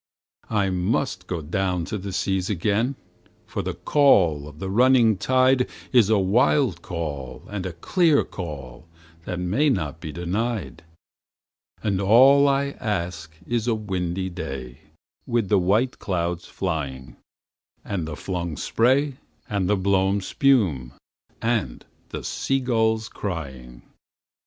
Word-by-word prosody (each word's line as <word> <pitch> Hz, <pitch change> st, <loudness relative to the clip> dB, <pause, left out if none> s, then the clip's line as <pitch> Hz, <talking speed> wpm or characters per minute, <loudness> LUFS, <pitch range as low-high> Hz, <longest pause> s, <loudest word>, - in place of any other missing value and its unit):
I 100 Hz, -3 st, +1 dB
must 90 Hz, 0 st, -1 dB, 0.2 s
down 90 Hz, -3 st, 0 dB
go -, -, -4 dB
to 110 Hz, -, -3 dB
the 100 Hz, +1 st, -6 dB
seas 95 Hz, +1 st, -1 dB
again, 105 Hz, +7 st, 0 dB, 0.5 s
for -, -, -4 dB
the -, -, -4 dB
call 90 Hz, -, +3 dB
of 75 Hz, -1 st, -12 dB
the 95 Hz, -, -5 dB
running 120 Hz, 0 st, +5 dB
tide 130 Hz, +5 st, +3 dB, 0.2 s
Is 120 Hz, -5 st, +5 dB
a 110 Hz, -, +4 dB
wild 100 Hz, -, +2 dB
call 75 Hz, -8 st, -5 dB
and 95 Hz, -3 st, -3 dB
a 90 Hz, -, -6 dB
clear 155 Hz, -, +2 dB
call 75 Hz, -5 st, -8 dB, 0.4 s
that 90 Hz, -, -3 dB
may 105 Hz, +13 st, +2 dB
not 80 Hz, -, -1 dB
be 80 Hz, -2 st, -6 dB
denied; 90 Hz, -, -3 dB, 1.0 s
And 100 Hz, -3 st, 0 dB
all 135 Hz, +8 st, +6 dB
I 140 Hz, 0 st, +1 dB
ask 85 Hz, -6 st, -3 dB
is 120 Hz, -1 st, -1 dB
a 115 Hz, -, +2 dB
windy 95 Hz, -3 st, -3 dB
day 65 Hz, -6 st, -6 dB, 0.5 s
with 115 Hz, -5 st, 0 dB
the 100 Hz, -, +4 dB
white 105 Hz, +8 st, +1 dB
clouds 85 Hz, -2 st, -2 dB
flying, 70 Hz, -8 st, -4 dB, 0.7 s
And 90 Hz, -6 st, -3 dB
the 75 Hz, -, -5 dB
flung 85 Hz, -2 st, -4 dB
spray 130 Hz, +4 st, +2 dB, 0.3 s
and 100 Hz, -3 st, -1 dB
the 105 Hz, -, +3 dB
blown 95 Hz, +1 st, +2 dB
spume, 95 Hz, -, +2 dB, 0.5 s
and 110 Hz, -, -1 dB, 0.2 s
the -, -, -6 dB
sea 135 Hz, 0 st, -1 dB
gulls 110 Hz, -3 st, +1 dB
crying. 65 Hz, -13 st, -6 dB
95 Hz, 130 wpm, -24 LUFS, 85-115 Hz, 1.0 s, all